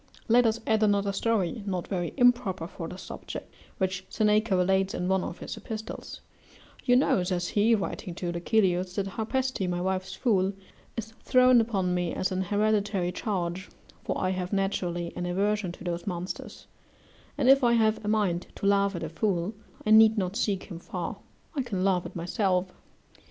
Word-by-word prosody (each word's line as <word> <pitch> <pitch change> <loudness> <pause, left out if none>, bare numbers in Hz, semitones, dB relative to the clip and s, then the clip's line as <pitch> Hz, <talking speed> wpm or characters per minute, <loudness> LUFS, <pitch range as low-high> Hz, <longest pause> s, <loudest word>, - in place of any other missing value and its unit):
Let 240 +1 +5
us 225 +1 0
add 220 -1 +2
another 200 -1 +2
story, 220 0 0
not 185 -3 -2
very 175 -3 -2
improper 245 -9 +3
for 170 -1 -7
this 180 +3 -8
subject, - - -8 0.2
which 185 -1 -1
Seneca 215 -1 +2
relates 190 +1 +2
in 180 - -2
one 190 0 +2
of - - -5
his - - -6
epistles: 220 0 -7 0.6
"You 245 - +4
know," 250 -7 +3
says 180 -1 -1
he, 220 +2 +4
writing 195 -3 -4
to 175 -1 -3
Lucilius, 180 0 +1
"that 200 - 0
Harpaste, 225 0 -1
my 175 0 -1
wife's 190 +1 -2
fool, 195 -5 +2 0.4
is 220 -1 -4
thrown 255 -1 +5
upon 195 -6 0
me 175 -2 -1
as 185 - -1
an 185 0 0
hereditary 205 -1 +1
charge, 185 -2 -3 0.3
for - - -2
I 185 - +1
have 185 -1 -3
naturally 180 -3 -1
an 175 - -3
aversion 200 +1 0
to - - -12
those 175 +1 -4
monsters; 180 -1 -5 0.7
and 275 -3 +1
if 270 +1 +7
I 240 -1 +5
have 220 -1 +2
a - - -5
mind 200 -5 +1
to - - -5
laugh 200 -1 +3
at 170 - -4
a 160 - -3
fool, 180 +2 -1 0.3
I 215 - +2
need 220 0 +7
not 185 -1 -1
seek 205 -5 0
him 170 -3 -8
far; - - -5 0.4
I 280 - +1
can 205 -7 -2
laugh 180 -3 +2
at 175 - -14
myself. 185 +1 0
195 Hz, 180 wpm, -28 LUFS, 180-220 Hz, 0.7 s, if